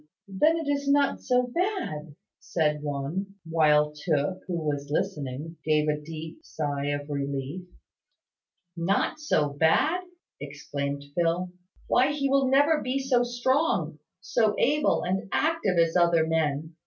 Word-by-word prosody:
Then, 300 +13 +2
it 325 -3 -4
is 285 -1 0
not 285 0 +2
so 250 -1 +2
bad," 245 - -3 0.2
said 150 -3 -1
one, 150 +7 -4
while 150 -2 +3
Tooke, 150 +3 -1
who 180 - -2
was 145 -3 -3
listening, 150 -2 -3
gave 155 -1 +2
a 150 0 0
deep 160 +1 -8
sigh 145 -2 -3
of 145 0 -2
relief. 140 +4 -4 1.1
"Not 190 - 0
so 155 - +1
bad!" 160 - +2 0.4
exclaimed 140 0 -5
Phil. 175 +2 0 0.3
"Why, 265 +3 +3
he 280 -2 0
will 275 -1 +3
never 290 +3 +4
be 255 +2 -1
so 265 -2 +2
strong 240 - 0 0.2
so 210 +3 +1
able 300 +3 +2
and 190 +3 -2
active 310 - +1
as 165 0 +3
other 170 -2 +4
men. 160 -1 -1
165 Hz, 135 wpm, -27 LUFS, 150-250 Hz, 1.1 s, never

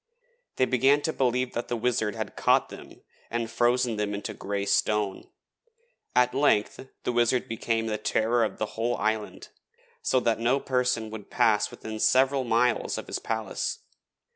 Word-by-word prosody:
They 130 - +3
began 135 +4 +3
to 160 - -1
believe 125 -1 0
that 120 - -3
the 120 - -2
Wizard 110 -3 0
had - - -5
caught - - +3
them - - -12 0.3
and 115 -1 -3
frozen 120 -1 +1
them 105 -1 -1
into 105 +2 -5
grey 100 0 -3
stone. 105 -1 0 0.9
At 125 0 +4
length 135 -2 +1 0.2
the - - 0
Wizard 120 +1 +2
became 115 0 -1
the 110 -1 -2
terror 115 +2 +1
of 110 - -2
the 110 - -1
whole 120 +2 -1
island, 110 0 -2 0.5
so 130 - +2
that 115 -2 +1
no 125 +4 +2
person 125 -4 0
would 110 -2 -9
pass 105 -2 +2
within 110 0 -7
several 135 +3 +3
miles 120 +1 +1
of - - -5
his - - -4
palace. 110 -3 -3
115 Hz, 165 wpm, -27 LUFS, 110-125 Hz, 0.9 s, At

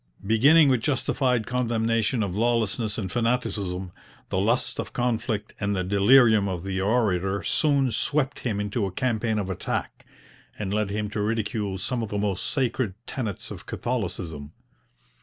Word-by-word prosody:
Beginning 140 +9 +6
with 130 -4 +3
justified 125 -3 +1
condemnation 115 -2 0
of 95 -3 -3
lawlessness 115 -1 0
and 95 -4 -3
fanaticism, 105 -7 -1 0.4
the 95 - 0
lust 115 +5 0
of - - -4
conflict 115 -3 -1
and 100 0 0
the 95 - 0
delirium 105 +2 +5
of 90 -2 -4
the 95 -1 -2
orator 100 -3 +1
soon 140 -4 +2
swept 140 +4 0
him 110 -5 -2
into 105 0 -1
a - - -5
campaign 110 +1 0
of 100 -3 -1
attack, 95 - -3 0.5
and 100 -2 -3
led 105 -1 0
him 105 +1 -2
to 105 - -2
ridicule 105 -2 -1
some 120 +6 -2
of 110 - -4
the 105 - -2
most 100 -2 -1
sacred 125 -6 0
tenets 110 -9 -4
of - - -9
Catholicism. 85 - -4
110 Hz, 155 wpm, -25 LUFS, 100-120 Hz, 0.5 s, Beginning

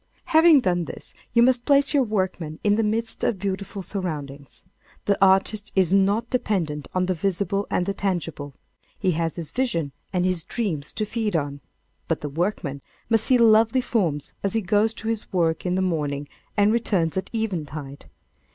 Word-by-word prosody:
Having 320 -3 +7
done 175 -5 0
this, - - -9 0.2
you 235 - +5
must 245 -1 +3
place 280 +1 +3
your 285 - +4
workman 185 -8 -2
in 205 - +4
the 220 - +2
midst 225 +1 -1
of 220 - +1
beautiful 195 0 -4
surroundings. 145 -8 -6 0.4
The 200 - +3
artist 195 +2 +3
is 190 -2 +3
not 200 +4 +3
dependent 165 - -1
on 185 0 +2
the 185 - 0
visible 195 +2 -1
and 180 - 0
the 200 - -1
tangible. 165 -8 -3 0.4
He 190 -3 +1
has 165 -1 -1
his 165 -4 -6
visions 220 - -1 0.2
and 180 -1 +1
his 180 -3 0
dreams 165 -12 -3
to 215 - -1
feed 215 -2 -2
on. 145 -2 -2 0.5
But 165 - -1
the 150 - -4
workman 150 -3 -2 0.3
must 225 -1 +3
see 255 - +4
lovely 225 +2 +5
forms 175 - -1
as 200 - -1
he 225 - +1
goes 210 +3 +2
to 220 - -7
his 225 -1 -3
work 165 -2 0
in 180 - +1
the 190 - +1
morning 145 -5 -1 0.3
and 205 +1 +4
returns 195 -8 +1
at 190 - -3
eventide. 155 - -4
190 Hz, 180 wpm, -24 LUFS, 165-220 Hz, 0.5 s, Having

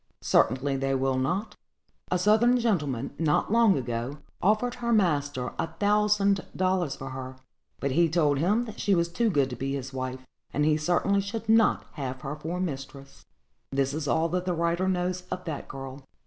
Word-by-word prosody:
"Certainly 135 +3 +2
they 135 0 0
will 135 0 +1
not; 190 +12 -1 0.5
a 180 - +2
Southern 220 +6 +4
gentleman, 150 - -1
not 160 +3 +1
long 230 -6 +5
ago, 120 +2 -3 0.2
offered 215 +5 +2
her 235 0 0
master 145 - +1
a - - 0
thousand 205 -1 +2
dollars 185 -5 0
for 135 - -7
her: 130 0 -6 0.4
but 140 - -1
he 170 +4 +3
told 150 -4 +2
him 210 +9 +2
that 220 - -9
she 200 - +2
was 170 -1 +2
too 225 +6 +1
good 140 -8 +1
to - - -4
be 135 +3 -3
his 135 -1 -6
wife, 130 0 -5 0.3
and 150 - +2
he 155 0 +4
certainly 175 +5 +1
should 215 +3 -5
not 225 0 +4
have 130 -3 -5
her 140 +2 -4
for 160 +4 -4
a - - -4
mistress." 140 -5 -6 0.4
This 135 0 0
is 150 -1 -3
all 160 +4 +2
that 180 +2 -1
the 180 - 0
writer 170 +2 0
knows 180 0 0
of 180 0 -5
that 160 -4 -5
girl. 135 0 -8
160 Hz, 190 wpm, -27 LUFS, 135-195 Hz, 0.5 s, long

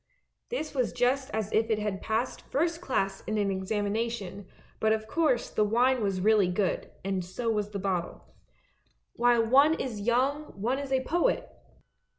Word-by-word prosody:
This 315 -12 -3
was 255 -4 0
just 260 +2 +1
as 220 -1 -3
if 225 +1 +2
it 220 - +2
had 210 -2 -3
passed 225 +3 -2
first 330 +4 0
class 195 - -1
in 215 - -1
an 200 -1 +1
examination, 205 0 -2 0.3
but 220 0 +3
of 220 0 -2
course 310 -3 +1
the 215 - +2
wine 245 +4 +3
was 195 -3 -1
really 210 -1 +4
good 180 +1 -1 0.2
and 190 -2 -1
so 225 +6 -2
was 210 -2 -1
the 205 - -5
bottle. 185 -3 -3 0.9
While 240 -1 +3
one 280 +7 +5
is 230 -9 -4
young 260 +4 0
one 245 +6 0
is 280 -1 -6
a 260 -1 +2
poet! 350 - +1
220 Hz, 165 wpm, -28 LUFS, 200-260 Hz, 0.9 s, one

